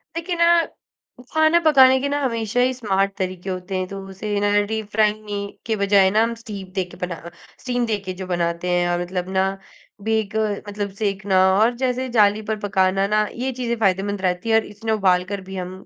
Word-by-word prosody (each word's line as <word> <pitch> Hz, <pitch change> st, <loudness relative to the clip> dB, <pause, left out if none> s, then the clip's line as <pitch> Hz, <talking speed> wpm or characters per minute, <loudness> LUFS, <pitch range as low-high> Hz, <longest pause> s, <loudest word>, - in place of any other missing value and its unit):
देखिए 340 Hz, +2 st, -3 dB
ना, 340 Hz, 0 st, +4 dB, 0.7 s
खाना 315 Hz, +2 st, +4 dB
पकाने 265 Hz, -4 st, +6 dB
के 280 Hz, -, -1 dB
ना, 290 Hz, +1 st, 0 dB
हमेशा 230 Hz, -2 st, -1 dB
ही 255 Hz, +1 st, +3 dB
स्मार्ट 200 Hz, -5 st, 0 dB
तरीके 185 Hz, -1 st, -4 dB
होते 185 Hz, +1 st, -4 dB
हैं। 185 Hz, 0 st, -2 dB
तो 195 Hz, +1 st, -7 dB
उसे 205 Hz, +2 st, -3 dB
ना, 205 Hz, 0 st, +1 dB, 0.2 s
डीप 220 Hz, 0 st, -3 dB
फ्राइंग 215 Hz, 0 st, +1 dB
मी 205 Hz, -1 st, -4 dB, 0.3 s
के 225 Hz, -, 0 dB
बजाए 200 Hz, -1 st, +5 dB
ना, 215 Hz, +2 st, +3 dB
हम 230 Hz, +1 st, -1 dB
स्टीम 200 Hz, -5 st, -8 dB
दे 190 Hz, -, +2 dB
के -, -, -11 dB
बना 175 Hz, -2 st, -7 dB, 0.4 s
स्टीम 245 Hz, -1 st, -1 dB
देके 205 Hz, -4 st, -3 dB
जो 185 Hz, -, -5 dB
बनाते 170 Hz, 0 st, -1 dB
हैं 175 Hz, 0 st, +2 dB
और 175 Hz, 0 st, 0 dB
मतलब 180 Hz, +1 st, -4 dB
ना, 195 Hz, +1 st, 0 dB, 0.4 s
बेक 220 Hz, -1 st, -1 dB, 0.3 s
मतलब 205 Hz, 0 st, -3 dB
सेकना 195 Hz, -2 st, 0 dB, 0.2 s
और 225 Hz, +3 st, +4 dB
जैसे 255 Hz, 0 st, 0 dB
जाली 210 Hz, -1 st, +4 dB
पर 220 Hz, -, 0 dB
पकाना 195 Hz, -1 st, +1 dB
ना, 215 Hz, +1 st, +2 dB, 0.2 s
ये 265 Hz, -, 0 dB
चीज़ें 240 Hz, -2 st, -2 dB
फ़ायदेमंद 195 Hz, 0 st, 0 dB
रहती 180 Hz, +3 st, -1 dB
हैं 220 Hz, -, +4 dB
और 225 Hz, -, +3 dB
इसमें 210 Hz, +2 st, -5 dB
उबाल 185 Hz, -4 st, +3 dB
कर 200 Hz, -1 st, -4 dB
भी 190 Hz, +1 st, -9 dB
हम 180 Hz, -1 st, -4 dB
205 Hz, 205 wpm, -22 LUFS, 190-230 Hz, 0.7 s, पकाने